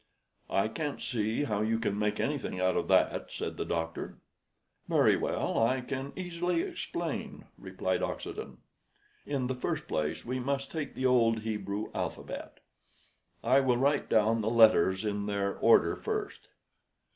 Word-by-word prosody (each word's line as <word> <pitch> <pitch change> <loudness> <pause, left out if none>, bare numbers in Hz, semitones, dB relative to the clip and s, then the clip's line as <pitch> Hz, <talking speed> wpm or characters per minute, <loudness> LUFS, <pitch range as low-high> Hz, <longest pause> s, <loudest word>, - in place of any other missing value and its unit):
"I 95 - +2
can't 145 +5 -4
see 110 +2 -1
how 105 -7 -1
you 110 +1 +1
can 115 -3 -1
make 105 0 0
anything 140 -10 -2
out 95 0 +2
of - - 0
that," - - +2
said - - -4
the - - -2
doctor. 80 0 -3 0.7
"Very - - +5
well, - - -1
I 130 +3 +2
can 135 +2 -4
easily 180 - -1
explain," 370 -3 -4
replied - - -2
Oxenden. 435 - -5 0.7
"In 135 -3 -1
the 130 - -1
first 125 - -3
place 75 -1 -2
we 130 +2 -2
must 135 +1 -2
take 155 -4 -4
the 130 - -2
old 115 -3 +4
Hebrew 105 -1 -3
alphabet. - - -5 0.8
I 130 +4 +5
will 130 -3 +2
write 140 +3 +1
down 110 +1 +3
the 110 - 0
letters 110 -4 +5
in 100 -1 -2
their 100 -1 -1
order - - +5
first." - - -4
115 Hz, 150 wpm, -30 LUFS, 105-135 Hz, 0.8 s, Very